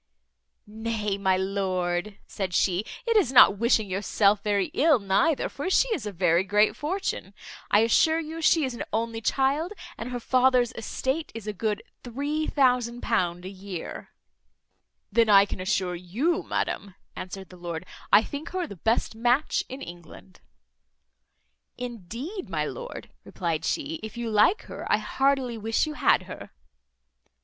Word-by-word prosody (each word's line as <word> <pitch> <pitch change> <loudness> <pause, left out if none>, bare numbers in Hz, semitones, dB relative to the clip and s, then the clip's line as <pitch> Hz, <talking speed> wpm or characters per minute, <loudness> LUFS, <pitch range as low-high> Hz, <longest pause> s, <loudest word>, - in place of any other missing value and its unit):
"Nay, 215 -1 -3
my 190 -2 +1
lord," 190 0 -1
said 185 -3 -4
she, 185 +1 +2 0.2
"it 460 -1 +1
is 390 - +4
not 205 -6 +7
wishing 230 -2 +3
yourself 200 +2 +2
very 200 -3 0
ill 305 0 +4
neither, 205 +9 +1
for 290 +6 -4
she - - +3
is 290 - -2
a - - -3
very 175 -1 +2
great 210 +2 +3
fortune: 300 - -3 0.3
I 205 - +5
assure 315 +8 +4
you 325 +1 -6
she 315 -1 +4
is 260 - -3
an 235 - -7
only 225 0 -2
child, 280 - +1 0.3
and 230 - -5
her 245 -1 -4
father's 255 0 +3
estate 265 +7 -3
is 225 -3 -7
a 210 - -3
good 210 +1 -2 0.2
£3000 245 - 0
a - - -4
year." 190 -2 -7 1.0
"Then 225 +1 +3
I 200 -1 +7
can 200 - -6
assure 185 -1 0
you, 220 - -1
madam," 200 -2 -2 0.2
answered 190 +1 -7
the 185 - -13
lord, 170 -1 -5 0.3
"I 205 +2 +7
think 290 +6 -6
her 370 -2 -1
the 200 - -10
best 225 +7 0
match 245 +6 +1
in 265 +2 -7
England." 165 - -12 1.4
"Indeed, 245 - -6
my - - -1
lord," - - -7
replied 165 -3 -3
she, 315 +1 -2
"if 220 +1 -8
you 235 -1 -3
like 215 - +4
her, - - -6
I - - +5
heartily 265 -4 0
wish 225 +6 +1
you 305 - -5
had - - +3
her." - - -9
225 Hz, 155 wpm, -26 LUFS, 195-270 Hz, 1.4 s, not